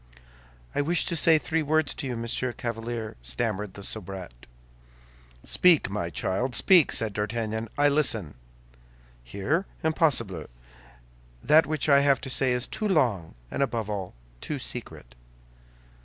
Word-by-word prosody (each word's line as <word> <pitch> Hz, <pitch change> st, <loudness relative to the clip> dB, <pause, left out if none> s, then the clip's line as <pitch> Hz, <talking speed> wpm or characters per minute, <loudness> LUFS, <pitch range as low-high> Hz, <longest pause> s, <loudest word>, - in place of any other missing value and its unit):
"I -, -, +1 dB
wish 165 Hz, +4 st, +1 dB
to 170 Hz, -, -1 dB
say 160 Hz, 0 st, +5 dB
three 160 Hz, +1 st, -1 dB
words 155 Hz, -1 st, +1 dB
to 145 Hz, -, -5 dB
you, 125 Hz, -2 st, -4 dB
Monsieur 120 Hz, +1 st, -2 dB
Chevalier," 115 Hz, -1 st, -5 dB
stammered 95 Hz, -, -3 dB
the 100 Hz, -, -9 dB
soubrette. 95 Hz, -, -6 dB, 1.0 s
"Speak, 170 Hz, -, +3 dB
my 100 Hz, -4 st, -3 dB
child, 120 Hz, +9 st, -2 dB
speak," 180 Hz, -6 st, +6 dB
said 110 Hz, -2 st, +1 dB
D'Artagnan; 110 Hz, +2 st, -3 dB
"I 145 Hz, 0 st, +4 dB
listen." 135 Hz, -, +1 dB, 0.9 s
"Here? 100 Hz, -, -2 dB, 0.2 s
Impossible! 125 Hz, -, +1 dB, 1.0 s
That 155 Hz, -1 st, +5 dB
which 155 Hz, -1 st, -1 dB
I 140 Hz, -1 st, +6 dB
have 140 Hz, -1 st, +3 dB
to 130 Hz, -, -4 dB
say 130 Hz, 0 st, +2 dB
is 125 Hz, 0 st, 0 dB
too 215 Hz, -, -3 dB
long, 120 Hz, -, 0 dB, 0.2 s
and -, -, -3 dB
above 115 Hz, -6 st, -1 dB
all, 95 Hz, -7 st, -5 dB, 0.3 s
too 150 Hz, -, -4 dB
secret." 120 Hz, -, -6 dB
120 Hz, 140 wpm, -26 LUFS, 105-150 Hz, 1.0 s, speak